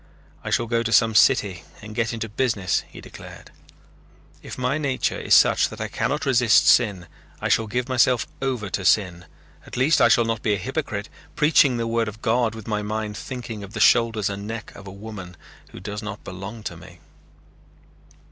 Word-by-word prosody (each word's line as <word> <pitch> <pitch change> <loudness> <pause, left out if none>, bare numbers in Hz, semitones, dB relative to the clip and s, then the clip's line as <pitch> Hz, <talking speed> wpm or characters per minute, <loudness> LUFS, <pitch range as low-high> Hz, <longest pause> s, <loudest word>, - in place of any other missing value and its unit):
"I - - -4
shall 120 - +1
go 115 0 0
to 115 0 -3
some 115 -1 +4
city 100 -3 +3 0.2
and 110 0 -10
get 115 -1 -1
into 115 -1 -4
business," 105 -4 -1
he - - -12
declared. - - -12 0.9
"If - - -9
my 130 +4 -1
nature 135 -4 -1
is - - +3
such - - +4
that - - -10
I - - -4
cannot 150 +2 -2
resist 120 -4 +4
sin, 100 -8 +3 0.3
I - - -2
shall 115 - +2
give 125 +3 -2
myself 125 -2 +2 0.2
over 125 -7 -2
to 95 - -2
sin. 90 -3 +1 0.4
At - - -8
least 140 +5 +3
I - - +7
shall 115 0 +4
not 115 -1 -2
be 105 -2 +1
a - - -3
hypocrite, 95 - -4 0.3
preaching 150 -4 +4
the 115 - -2
word 115 0 0
of 110 +1 -9
God 115 -1 +1
with 110 -1 -10
my 105 -1 -1
mind 105 0 -4
thinking 120 -4 -7
of 100 +1 -11
the 110 - -5
shoulders 115 -2 +3
and 100 0 -5
neck 115 +1 -6
of 100 0 -12
a - - -8
woman 100 -3 -9 0.3
who - - -11
does 105 +3 -6
not 105 -1 -7
belong 100 +4 -8
to 85 - -5
me." 90 +1 -14
110 Hz, 195 wpm, -23 LUFS, 100-120 Hz, 0.9 s, I